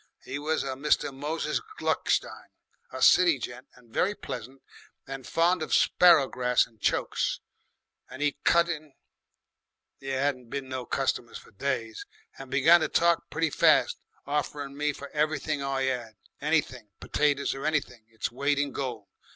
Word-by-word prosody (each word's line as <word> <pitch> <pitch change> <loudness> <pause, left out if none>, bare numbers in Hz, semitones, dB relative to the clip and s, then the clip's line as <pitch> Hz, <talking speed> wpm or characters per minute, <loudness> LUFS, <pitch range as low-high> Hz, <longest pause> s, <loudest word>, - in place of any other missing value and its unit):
He 140 - -5
was 155 +2 -1
a 135 - -4
Mr. 140 +1 0
Moses 150 +4 -2 0.2
Gluckstein, - - -1 0.4
a - - -3
city 175 -5 +6
gent 125 +2 -7
and 120 -2 -21
very 205 +3 +1
pleasant 130 - -8 0.4
and 135 -1 -7
fond 170 +1 +2
of 155 - +1
sparrowgrass 135 -8 +4
and 110 -3 -25
chokes, - - 0 0.7
and 135 - -5
'e 145 -1 +1
cut 170 0 +4
in 155 -4 -5 1.1
there 135 0 -2
'adn't 125 -4 -3
been 135 +1 -4
no 130 -2 -5
customers - - -1
for - - -16
days 115 -1 -3 0.3
and 135 -1 -9
began 155 +6 +6
to - - +1
talk 170 0 +2
very 160 0 0
fast, - - +3 0.3
offerin' 145 -1 -3
me 150 +1 0
for 140 0 -9
anything 155 -1 -1
I 135 -1 -1
'ad, 120 -4 -4 0.3
anything, 140 -7 0
petaties 145 -1 0
or 135 - -7
anything, 130 -7 -2
its 115 0 -4
weight 140 +3 0
in 145 0 0
gold. 120 -7 -5
140 Hz, 150 wpm, -27 LUFS, 130-150 Hz, 1.1 s, city